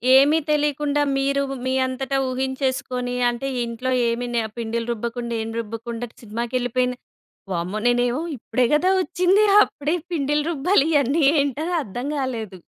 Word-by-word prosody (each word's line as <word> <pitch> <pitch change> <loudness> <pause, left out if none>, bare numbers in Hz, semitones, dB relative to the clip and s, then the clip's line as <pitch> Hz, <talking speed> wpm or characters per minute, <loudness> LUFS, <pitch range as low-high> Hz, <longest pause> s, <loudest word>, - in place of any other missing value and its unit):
ఏమి 285 +4 +6
తెలీకుండా 295 -1 +1 0.2
మీరు 275 +1 +1 0.2
మీ 260 - 0
అంతట 260 +1 -4 0.2
ఊహించేసుకొని 260 -1 -2
అంటే, 240 +3 -3 0.2
"ఇంట్లో 235 +2 -3 0.2
ఏమి 235 +1 -2
నె 235 - +2 0.2
పిండిలు 230 0 -3
రుబ్బకుండా 235 +1 -4
ఏం 225 - -5
రుబ్బకుండా 230 +2 -5
సినిమాకెళ్ళిపోయింది." 245 +2 -1 0.6
వామ్మో! 180 +5 -2
నేనేమో 245 +3 +2 0.2
ఇప్పుడే 245 +2 0
గదా 360 +5 +3
ఒచ్చింది. 365 +3 +3 0.2
అప్పుడే 295 +4 -2 0.2
పిండిలు 295 -1 +1
రుబ్బాలి 315 +1 +2
ఇయన్నీ 285 +2 +2 0.2
ఏంటని 290 +5 -2
అర్థం 245 +5 -5
గాలేదు. 230 -8 -3
255 Hz, 125 wpm, -22 LUFS, 235-285 Hz, 0.6 s, ఏమి